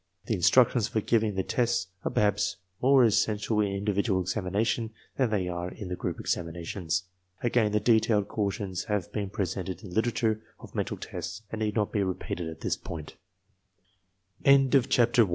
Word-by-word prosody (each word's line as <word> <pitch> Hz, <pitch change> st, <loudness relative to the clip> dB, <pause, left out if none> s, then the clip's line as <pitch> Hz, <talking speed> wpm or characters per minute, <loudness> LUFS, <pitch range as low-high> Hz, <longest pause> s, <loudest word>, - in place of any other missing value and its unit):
The -, -, -1 dB
instructions 115 Hz, +4 st, +4 dB
for 115 Hz, -2 st, 0 dB
giving 110 Hz, -1 st, +1 dB
the 95 Hz, -, 0 dB
tests 120 Hz, -5 st, 0 dB
are -, -, 0 dB
perhaps 105 Hz, 0 st, +1 dB, 0.3 s
more 135 Hz, 0 st, +6 dB
essential 105 Hz, 0 st, +1 dB
in 100 Hz, -1 st, 0 dB
individual 100 Hz, 0 st, +1 dB
examination 100 Hz, +5 st, -1 dB, 0.3 s
than 130 Hz, -3 st, +2 dB
they 100 Hz, -4 st, 0 dB
are 90 Hz, 0 st, -3 dB
in 95 Hz, 0 st, -8 dB
the 90 Hz, -, -2 dB
group -, -, -4 dB
examinations. 85 Hz, +1 st, -2 dB, 0.4 s
Again, 115 Hz, -3 st, +2 dB
the 105 Hz, -, +2 dB
detailed 110 Hz, -3 st, +3 dB
cautions 100 Hz, -3 st, -2 dB
have 105 Hz, -4 st, -2 dB
been 100 Hz, -2 st, -2 dB
presented 95 Hz, -2 st, -3 dB
in 100 Hz, -, -8 dB
the 90 Hz, -, -9 dB
literature 110 Hz, -1 st, +1 dB, 0.2 s
of -, -, -12 dB
mental -, -, -2 dB
tests 110 Hz, -, -6 dB
and 110 Hz, -, -4 dB
need 105 Hz, -1 st, 0 dB
not 105 Hz, -3 st, +1 dB
be 105 Hz, -, +1 dB
repeated 90 Hz, -2 st, -3 dB
105 Hz, 150 wpm, -28 LUFS, 95-110 Hz, 0.4 s, more